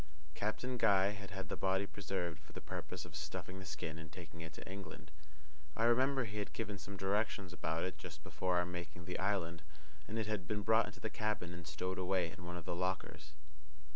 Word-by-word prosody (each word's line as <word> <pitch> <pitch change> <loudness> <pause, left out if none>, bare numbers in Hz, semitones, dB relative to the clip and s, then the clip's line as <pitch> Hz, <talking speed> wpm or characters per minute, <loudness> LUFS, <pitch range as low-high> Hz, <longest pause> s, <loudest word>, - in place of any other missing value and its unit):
Captain 125 +7 0
Guy 100 -3 +6
had 100 -1 -6
had 95 0 -4
the - - 0
body 95 +1 +3
preserved 90 -5 -2
for 80 - -16
the - - -4
purpose - - -4
of - - -9
stuffing 95 +1 -3
the 95 - -7
skin 80 0 -3
and 80 0 -8
taking 80 -1 -8
it 80 0 -5
to - - -8
England. 90 -5 -6 0.7
I 115 - +4
remember 130 +3 +6
he 105 -2 -3
had 105 - -2
given 105 -3 -2
some 100 +1 -6
directions 95 -1 +1
about 80 -2 0
it 95 - -2
just 80 -4 -7
before 90 +4 +2
our 90 - +4
making 85 -1 -5
the 90 - -2
island, 90 -4 +1 0.5
and 110 - -2
it 110 - +2
had 105 -5 -1
been 105 +1 0
brought 110 +1 +6
into 105 - -8
the 110 - -1
cabin 105 -5 0
and 85 -1 -7
stowed 90 +5 -1
away 90 -2 +3
in 85 +2 -9
one 85 0 -3
of 85 - -6
the - - 0
lockers. 90 -4 -1
95 Hz, 215 wpm, -38 LUFS, 85-105 Hz, 0.7 s, Guy